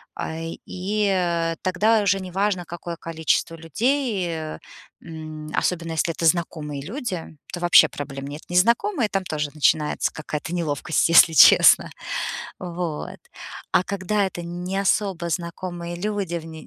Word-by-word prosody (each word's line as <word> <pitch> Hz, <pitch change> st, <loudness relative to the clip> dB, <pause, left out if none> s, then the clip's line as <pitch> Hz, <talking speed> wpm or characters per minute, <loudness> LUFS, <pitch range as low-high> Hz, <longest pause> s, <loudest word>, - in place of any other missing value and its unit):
А, -, -, -4 dB, 0.3 s
и, 205 Hz, +3 st, -1 dB
э, 170 Hz, -2 st, 0 dB
тогда 210 Hz, +5 st, +2 dB
уже 195 Hz, -1 st, +2 dB
неважно, 190 Hz, 0 st, -1 dB
какое 170 Hz, 0 st, -7 dB
количество 165 Hz, 0 st, -1 dB
людей, 215 Hz, -, 0 dB
э, 160 Hz, -2 st, -5 dB, 0.4 s
м, 155 Hz, -2 st, -8 dB
особенно 170 Hz, -2 st, -1 dB
если 160 Hz, +2 st, 0 dB
это 165 Hz, -, -3 dB
знакомые 155 Hz, -4 st, 0 dB
люди, 185 Hz, -, -5 dB, 0.2 s
то 175 Hz, -, -4 dB
вообще 170 Hz, -2 st, +6 dB
проблем 140 Hz, -2 st, -7 dB
нет. 145 Hz, +2 st, -7 dB
Незнакомые- 235 Hz, -, +2 dB
там 195 Hz, -2 st, -1 dB
тоже 150 Hz, -4 st, -3 dB
начинается 150 Hz, 0 st, +1 dB
какая-то 155 Hz, +2 st, -5 dB
неловкость, 160 Hz, -1 st, 0 dB
если 165 Hz, -1 st, +7 dB
честно. -, -, +7 dB, 0.7 s
Вот. 175 Hz, -3 st, -5 dB, 0.5 s
А 180 Hz, -, +3 dB
когда 200 Hz, +1 st, -1 dB
это 185 Hz, -2 st, -5 dB
не 175 Hz, +3 st, -4 dB
особо 190 Hz, -3 st, 0 dB
знакомые 170 Hz, 0 st, -4 dB
люди, 200 Hz, -1 st, -3 dB
в -, -, -12 dB
н 165 Hz, -, -10 dB
175 Hz, 135 wpm, -23 LUFS, 160-190 Hz, 0.7 s, если